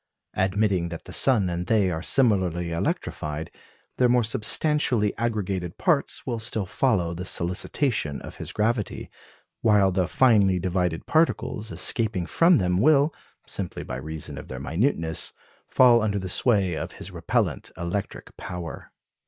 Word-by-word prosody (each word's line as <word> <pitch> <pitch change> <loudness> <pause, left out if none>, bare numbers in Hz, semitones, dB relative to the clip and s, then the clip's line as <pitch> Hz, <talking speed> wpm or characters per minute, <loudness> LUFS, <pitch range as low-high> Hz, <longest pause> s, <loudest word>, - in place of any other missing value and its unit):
Admitting 95 -2 0
that 85 -1 -7
the - - -11
sun 115 -8 +4
and 90 0 -3
they 105 -5 +2
are 80 -1 -3
similarly 90 -8 +2
electrified, 75 -2 -3 0.5
their 125 -1 +3
more 120 0 +3
substantially 120 -1 +2
aggregated 100 -7 -3
parts - - 0
will 115 - -3
still 110 -2 0
follow 90 -5 0
the 90 +2 -6
solicitations 90 - -1
of - - -10
his - - -6
gravity, 110 0 -2 0.5
while 105 -4 +4
the 90 -1 0
finely 100 -5 +3
divided 90 -2 -1
particles 155 -9 0
escaping 105 -6 +1
from 170 - +4
them 90 -1 +1
will, 150 +2 +4 0.3
simply - - -4
by 65 - -6
reason 80 +3 -6
of - - -11
their 65 - -7
minuteness, 80 - -1 0.3
fall 120 -2 +5
under 105 -1 0
the 95 -1 -4
sway 100 -3 +2
of - - -5
his - - -9
repellent - - -1
electric 85 +4 -5
power. 90 -2 -7
95 Hz, 145 wpm, -25 LUFS, 85-115 Hz, 0.5 s, fall